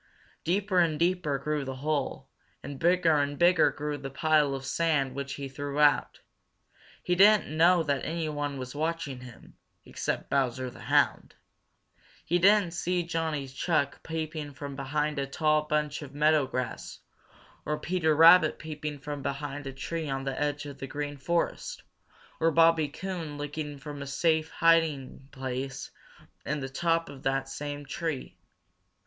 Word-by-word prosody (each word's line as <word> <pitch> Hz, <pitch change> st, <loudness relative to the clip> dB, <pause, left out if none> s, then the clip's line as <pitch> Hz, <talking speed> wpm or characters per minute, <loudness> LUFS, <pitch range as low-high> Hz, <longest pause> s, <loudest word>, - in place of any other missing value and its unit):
Deeper 190 Hz, +2 st, +1 dB
and 165 Hz, -3 st, +2 dB
deeper 170 Hz, -3 st, +1 dB
grew 150 Hz, +1 st, -2 dB
the 135 Hz, -1 st, -5 dB
hole, 140 Hz, -1 st, -2 dB, 0.4 s
and 140 Hz, -1 st, -7 dB
bigger 170 Hz, -1 st, +3 dB
and 145 Hz, 0 st, 0 dB
bigger 175 Hz, +1 st, +5 dB
grew 150 Hz, -1 st, -4 dB
the 135 Hz, 0 st, -6 dB
pile 150 Hz, 0 st, +2 dB
of 135 Hz, 0 st, -6 dB
sand 150 Hz, -6 st, +1 dB
which 140 Hz, 0 st, -4 dB
he 140 Hz, -1 st, -5 dB
threw 140 Hz, +2 st, -5 dB
out. 145 Hz, -1 st, +3 dB, 0.8 s
He 180 Hz, -, +1 dB
didn't 200 Hz, -3 st, +5 dB
know 170 Hz, +2 st, +5 dB
that 140 Hz, -3 st, -1 dB
anyone 150 Hz, -4 st, -3 dB
was 130 Hz, -1 st, -6 dB
watching 155 Hz, -3 st, -2 dB
him, 125 Hz, -2 st, -13 dB, 0.3 s
except -, -, -3 dB
Bowser 130 Hz, -2 st, 0 dB
the -, -, -14 dB
Hound. -, -, +1 dB, 0.9 s
He 175 Hz, +2 st, +2 dB
didn't 200 Hz, -1 st, +5 dB
see 175 Hz, 0 st, -1 dB
Johnny 160 Hz, -4 st, -2 dB
Chuck 140 Hz, +1 st, -1 dB
peeping 155 Hz, -3 st, -5 dB
from 140 Hz, 0 st, -6 dB
behind 150 Hz, +2 st, -1 dB
a 135 Hz, -, -2 dB
tall 155 Hz, +2 st, +1 dB
bunch 150 Hz, -1 st, -1 dB
of 140 Hz, -1 st, -10 dB
meadow 150 Hz, -1 st, +3 dB
grass, 125 Hz, -2 st, -4 dB, 0.7 s
or 150 Hz, -, -2 dB
Peter 165 Hz, -3 st, +1 dB
Rabbit 165 Hz, 0 st, +7 dB
peeping 150 Hz, -1 st, -6 dB
from 145 Hz, 0 st, -6 dB
behind 140 Hz, 0 st, -4 dB
a -, -, -4 dB
tree 155 Hz, +4 st, -4 dB
on 135 Hz, 0 st, -2 dB
the 135 Hz, +1 st, -3 dB
edge 145 Hz, 0 st, -1 dB
of 140 Hz, -1 st, -9 dB
the 135 Hz, -, -5 dB
Green 145 Hz, +1 st, -4 dB
Forest, 170 Hz, +5 st, -2 dB, 0.6 s
or 165 Hz, -, +4 dB
Bobby 165 Hz, -1 st, +4 dB
Coon 165 Hz, -1 st, -5 dB
looking 145 Hz, 0 st, -5 dB
from 145 Hz, +1 st, -8 dB
a 140 Hz, -, -6 dB
safe 160 Hz, +3 st, +1 dB
hiding 155 Hz, -5 st, +1 dB
place 130 Hz, 0 st, -5 dB, 0.5 s
in 150 Hz, +1 st, -2 dB
the 135 Hz, -1 st, -5 dB
top 165 Hz, +4 st, 0 dB
of 135 Hz, -2 st, -10 dB
that 135 Hz, 0 st, 0 dB
same 145 Hz, +1 st, -6 dB
tree. 150 Hz, -, -4 dB
150 Hz, 155 wpm, -28 LUFS, 140-165 Hz, 0.9 s, Rabbit